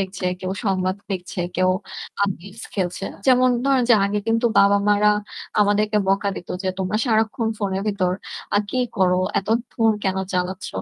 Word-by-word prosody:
দেখছে, 190 -1 -3
কেউ 185 0 -3
সংবাদ 185 -1 0
দেখছে, 180 -1 -4 0.2
কেউ 185 0 +3 0.5
আ - - +6 0.2
games 200 +5 -11
খেলছে। 185 -1 -2 0.2
যেমন 255 0 +5 0.2
ধরেন 270 -2 +3
যে - - +9
আগে 205 +1 0
কিন্তু 230 +1 +2
বাবা-মারা 205 +1 +4 0.5
আমাদেরকে 210 +1 +2
বকা 200 +1 +2
দিত 175 - -8
যে 190 - -1
"তোমরা 190 +3 -1
সারাক্ষণ 220 -1 +1
phone-এর 195 -2 -1
ভিতর 185 -3 0 0.4
আ - - +6
কি 255 - 0 0.2
করো? 180 -1 +3 0.2
এত 195 - -6 0.3
phone 225 -2 +3
কেন 190 -1 0 0.2
চালাচ্ছ?" 185 0 -2
200 Hz, 160 wpm, -22 LUFS, 185-215 Hz, 0.5 s, যে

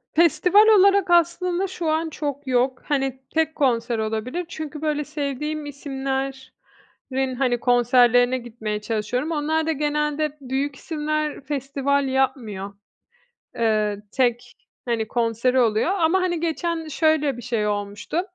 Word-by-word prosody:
festival 360 +6 +5
olarak 400 -3 +5
aslında, 350 +2 +2
şu 345 -3 -3
an 320 +1 0
çok 285 -2 -5
yok. 255 +1 +1
Hani, 270 -3 -1
tek 320 0 +1
konser 235 -4 +1
olabilir. 220 +10 -3
Çünkü, 310 -2 -6
böyle, 300 -1 0
sevdiğim 300 +1 -4
isimlerin, 270 -1 -5
hani, 245 -2 +1
konserlerine 245 +1 +4
gitmeye 220 -3 -5
çalışıyorum. 230 +7 -2
Onlar 315 +1 0
da, - - +2
genelde 300 0 -1
büyük 275 +2 -2
isimler, 305 0 -3
festival 275 0 -1
yapmıyor. 230 -7 -1 0.8
Eee, 215 -3 +1
tek, 245 -1 0 0.3
hani, 230 -3 -1
konseri 235 +2 +1
oluyor, 225 - +2
ama, 370 -1 +2
hani, 350 -2 0
geçen 330 0 -2
şöyle 310 -3 +1
bir - - -7
şey 230 -3 -1
olmuştu. 205 +10 -2
275 Hz, 125 wpm, -23 LUFS, 245-315 Hz, 0.8 s, festival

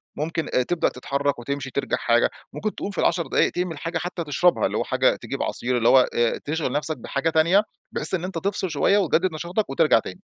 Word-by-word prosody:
ممكن 165 +1 -3 0.2
تبدأ 175 -1 +1
تتحرك 140 +1 -2
وتمشي 140 +2 -4
ترجَع 140 - -1
حاجة، 120 0 +2 0.2
ممكن 215 0 -3
تقوم 200 - -4
في 200 - -8
ال10 170 -1 +1
دقايق - - +2
تعمل 175 -3 -3
حاجة 165 +3 -3
حتى 175 0 -4
تشربها، 160 +4 +2
اللي - - -1
هو - - 0
حاجة - - +2
تجيب - - -5
عصير، 125 +1 -1
اللي 115 0 +3
هو 130 -1 +6
آآ 120 -1 +1
تشغِل 150 -3 -2
نفسك 150 +2 -2
بحاجة 140 +4 -2
تانية، 170 +6 +4 0.3
بحيث - - +1
إن 180 -2 0
أنت 185 -2 -4
تفصِل 190 +1 -1
شوية 155 +6 +2
وتجدد 185 -1 +2
نشاطك 175 +7 -2
وترجَع 135 -3 +4
تاني. 95 - -9
160 Hz, 210 wpm, -24 LUFS, 140-180 Hz, 0.3 s, هو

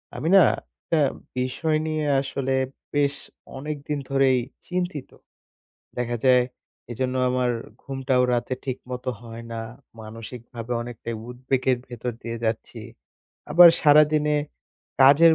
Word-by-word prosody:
আমি 140 +7 -3
না, 195 - +9 0.4
একটা 165 - -1 0.4
বিষয় 135 +5 0
নিয়ে 155 -1 -1 0.2
আসলে 135 -1 -3 0.4
বেশ 140 -1 +2 0.4
অনেকদিন 150 +1 -4
ধরেই 135 -1 +3 0.3
চিন্তিত। 180 -5 -3 0.9
দেখা 120 -1 -1
যায়, 125 -1 +6 0.5
এজন্য 130 +2 -2 0.2
আমার 125 -1 +1 0.3
ঘুমটাও 135 -2 0
রাতে 120 +2 -1
ঠিকমতো 125 -1 -4
হয় 115 0 -9
না। 115 - -4 0.4
মানসিক 115 +3 -8
ভাবে 115 0 -5
অনেকটাই 115 -1 -6
উদ্বেগের 130 +1 0
ভেতর 120 0 -4
দিয়ে 115 0 -4
যাচ্ছি। 110 0 -3 0.7
আবার 170 +3 +10
সারাদিনে 150 0 +5 0.7
কাজের 155 +5 +7
130 Hz, 115 wpm, -24 LUFS, 125-150 Hz, 0.9 s, আবার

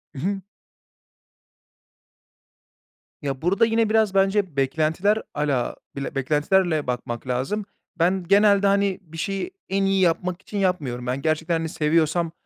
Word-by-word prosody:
Hı - - -6
hı. 195 +5 -2 2.8
Ya, 135 -3 -3
burada 195 +7 +3
yine 225 -1 +1
biraz 220 -2 +2
bence 195 -3 +2
beklentiler 160 +9 +1
ala 145 -4 -1 0.2
bile 140 +1 -5
beklentilerle 155 +3 +1
bakmak 125 0 -4
lazım. 135 +12 -2 0.3
Ben, 180 +3 +2
genelde, 200 +1 +5
hani, 200 -1 +2
bir 165 -3 -13
şeyi 195 - -3 0.2
en 195 0 +1
iyi 195 0 +2
yapmak 180 +1 +1
için 205 - -7
yapmıyorum. 145 -11 -1
Ben, 130 +2 -2
gerçekten, 160 +2 0
hani, 165 0 -3
seviyorsam, 160 +2 +1
175 Hz, 130 wpm, -23 LUFS, 150-195 Hz, 2.8 s, genelde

